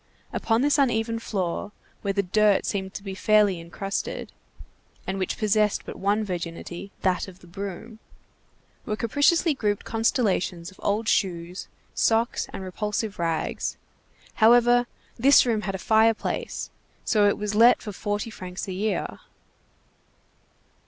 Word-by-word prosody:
Upon 230 +2 +1
this 290 +1 +3
uneven 230 -3 +1
floor, 195 -3 -3 0.3
where 200 - -1
the 200 0 0
dirt 205 +2 +3
seemed 190 -2 -3
to 200 - -6
be 195 -2 -5
fairly 205 -1 +3
incrusted, 195 +4 -4 0.8
and 190 0 -3
which 185 - -2
possessed 210 -1 +1
but - - -7
one 205 +2 +1
virginity, 175 0 -5
that 185 0 +1
of 185 -2 -12
the - - -15
broom, 200 +5 -7 0.8
were 215 - -2
capriciously 290 +9 +2
grouped 210 -6 -1
constellations 205 -6 0
of 190 - -20
old 215 +2 0
shoes, 180 -3 -1 0.3
socks, 230 +1 +1
and 190 - -6
repulsive 210 +2 -3
rags; 165 -2 -2 0.6
however, 240 +2 +6 0.3
this 275 +3 +6
room 225 -3 +1
had 195 -2 -3
a - - -2
fireplace, 220 +3 +1 0.3
so 210 -3 +4
it 205 - +2
was 210 0 -3
let 230 +4 +6
for 210 - -7
forty 205 +2 -3
francs 185 -2 -7
a 190 - -4
year. 210 +3 -2
210 Hz, 140 wpm, -25 LUFS, 190-225 Hz, 0.8 s, however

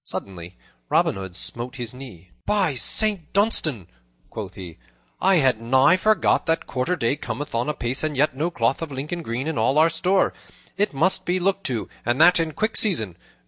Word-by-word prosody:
Suddenly 90 -2 -7 0.3
Robin - - +2
Hood 95 -2 -8
smote 120 +7 -2
his 120 -3 -6
knee. 115 -10 -12 0.2
"By 200 -7 +2
Saint 185 - +1
Dunstan," 160 - +1 0.5
quoth - - -7
he, 90 -4 -10 0.4
"I 195 0 +4
had 130 -8 +2
nigh 130 +8 +4
forgot 205 -2 +2
that 165 0 0
quarter 135 +7 -1
day 120 -3 0
cometh 145 0 -6
on 120 +5 -1
apace, 130 -2 -2
and 155 -3 -2
yet 145 0 +2
no 155 +5 -1
cloth 125 -4 0
of 165 -3 -5
Lincoln 150 +6 -5
green 125 -2 -4
in 160 -6 -2
all 130 +6 +2
our 160 +2 +5
store. 185 +4 +1 0.4
It 205 +1 0
must 165 +7 +1
be 180 +1 0
looked 195 +1 -1
to, 120 -5 -2 0.2
and 120 +2 0
that 180 - +6
in 160 -1 -1
quick 215 +5 -1
season. 110 - +1
145 Hz, 185 wpm, -23 LUFS, 120-175 Hz, 0.5 s, that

